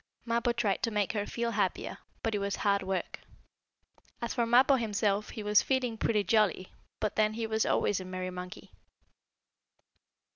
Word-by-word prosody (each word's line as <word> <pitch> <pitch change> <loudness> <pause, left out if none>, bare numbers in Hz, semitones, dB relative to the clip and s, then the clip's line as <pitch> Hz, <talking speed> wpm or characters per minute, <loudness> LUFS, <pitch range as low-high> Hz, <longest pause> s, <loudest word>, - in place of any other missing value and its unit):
Mappo 235 +1 +1
tried 225 -5 0
to 230 - +1
make 210 -2 0
her 205 -1 -2
feel 235 0 -2
happier, - - -1 0.2
but 225 - 0
it 205 - 0
was 200 0 -1
hard 200 -1 +1
work. 190 -1 -3 1.0
As 235 - -3
for 235 -2 0
Mappo, 260 +3 +5
himself, 210 -2 0
he 215 - -6
was 210 0 +5
feeling 255 -3 0
pretty 215 -1 +1
jolly, 205 -4 +1 0.3
but 215 -1 -1
then 215 0 +3
he 230 0 -2
was 220 0 0
always 205 - +1
a 185 - -7
merry 185 0 -4
monkey. 180 0 -8
215 Hz, 170 wpm, -30 LUFS, 200-230 Hz, 1.0 s, Mappo